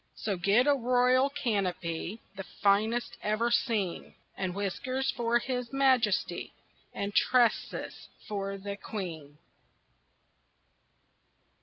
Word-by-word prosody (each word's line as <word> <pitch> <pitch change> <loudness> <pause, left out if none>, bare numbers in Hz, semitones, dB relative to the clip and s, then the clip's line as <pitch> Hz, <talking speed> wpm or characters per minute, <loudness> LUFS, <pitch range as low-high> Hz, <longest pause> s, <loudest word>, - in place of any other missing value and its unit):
So 205 -3 -2
get 200 +8 +3
a 290 - +5
royal 255 +1 +3
canopy, 195 - -2
The 195 - -5 0.2
finest 215 +4 +2
ever 215 +3 0
seen, 220 -7 0 0.2
And 185 -2 -3
whiskers 255 +7 -1
for 235 -2 +1
his 250 0 -3
majesty, 260 -6 +1 0.4
And 200 0 -4
tresses 245 0 +1 0.2
for 195 -2 -3
the 200 +1 -6
queen. 165 -10 -6
215 Hz, 100 wpm, -30 LUFS, 195-250 Hz, 0.4 s, a